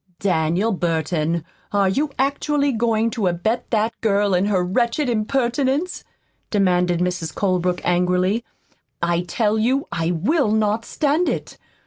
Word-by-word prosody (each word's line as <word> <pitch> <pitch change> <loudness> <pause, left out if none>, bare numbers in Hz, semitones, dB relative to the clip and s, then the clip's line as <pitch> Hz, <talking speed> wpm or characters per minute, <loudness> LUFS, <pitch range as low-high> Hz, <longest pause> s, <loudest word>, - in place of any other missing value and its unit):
"Daniel 180 +3 +1
Burton, 165 -2 -1 0.3
are 200 -1 +2
you 285 +11 0
actually 280 +1 +1
going 230 -1 +1
to 220 -6 -1
abet 180 +7 -1
that 220 0 +1
girl 205 -2 +2
in 180 +2 +2
her 195 -3 +1
wretched 235 +9 0
impertinence?" 265 +7 0 0.5
demanded 180 -4 +2
Mrs. 175 -3 -2
Colebrook 180 -2 0
angrily. 180 +5 +1 0.6
"I 170 0 +1
tell 210 +5 0
you 260 +5 +1
I 165 0 -1
will 215 - +1
not 220 +1 +1
stand 305 +4 +1
it! - - -5
205 Hz, 130 wpm, -21 LUFS, 180-240 Hz, 0.6 s, are